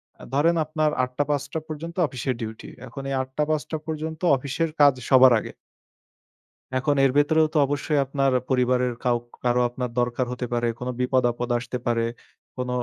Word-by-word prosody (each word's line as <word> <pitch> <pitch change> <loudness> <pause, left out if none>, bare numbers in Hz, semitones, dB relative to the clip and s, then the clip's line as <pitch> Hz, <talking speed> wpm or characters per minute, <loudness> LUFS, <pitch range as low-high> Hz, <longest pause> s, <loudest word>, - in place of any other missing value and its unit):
অ্যা - - -15
ধরেন 160 +5 +3
আপনার 155 0 0
৮ 125 - -3
টা- 145 - +3
৫ 145 -2 +1
টা 160 - 0
পর্যন্ত 160 +2 -6
অফিসের 130 -1 -3
ডিউটি। 110 0 -6 0.2
এখন 135 - -8
এই - - -2
৮ 130 - -6
টা- 150 - +3
৫ 155 -1 +1
টা 160 - -1
পর্যন্ত 160 +1 -4 0.2
অফিসের 140 +5 -2
কাজ 145 -1 +7 0.2
সবার 130 -2 +7
আগে। - - -7 1.2
এখন 145 +3 +1
এর 135 - +3
ভেতরেও 155 +2 +4
তো - - +1
অবশ্যই 145 +1 0
আপনার 135 0 +1 0.2
পরিবারের 125 -1 +2
কাও 120 -1 +2 0.3
কারো 125 0 +2
আপনার 125 +1 -4
দরকার 120 +1 0
হতে 125 0 -3
পারে, 120 0 +1
কোন 125 - -5
বিপদ-আপদ 125 -1 +1
আসতে 125 +1 -4
পারে, 115 -1 +1 0.5
কোন 125 0 -3
130 Hz, 180 wpm, -24 LUFS, 125-150 Hz, 1.2 s, কাজ